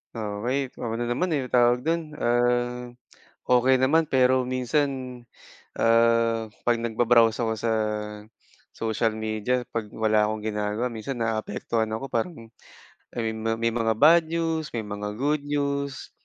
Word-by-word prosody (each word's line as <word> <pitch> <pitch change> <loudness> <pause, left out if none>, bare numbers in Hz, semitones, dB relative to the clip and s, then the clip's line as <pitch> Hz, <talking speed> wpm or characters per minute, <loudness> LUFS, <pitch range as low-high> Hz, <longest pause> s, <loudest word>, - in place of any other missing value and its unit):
Okay. 115 +5 -2
Ako 115 -1 -4
nanaman, 120 +9 -1
eh, 135 - -2
ano'ng - - -12
tawag 120 0 +4
do'n, 165 +1 +1 0.2
ah, 120 0 0 0.6
okay 125 +1 +4
naman 150 +5 +2
pero 130 0 +4
minsan, 130 +3 0 0.9
ah, 115 0 +3 0.2
'pag 120 -1 +2
nagba-browse 115 0 +3
ako 110 -1 0
sa, 115 +1 -1 1.0
social 115 0 0
media 110 +3 -1
'pag 110 -2 -3
wala 110 -1 +2
akong 110 0 -4
ginagawa 105 +2 -1
minsan 120 +2 -5
naaapektuhan 110 0 -2
ako. 110 +5 -4
Parang, 115 0 -3 0.7
ayun 110 -2 -2
ma 115 - +1
may 115 0 0
mga 115 -1 0
bad 160 +7 +6
news, 165 -1 -1
may 115 - -1
mga 105 0 -5
good 145 +1 +1
news. 140 -1 -2
120 Hz, 135 wpm, -25 LUFS, 110-130 Hz, 1.0 s, bad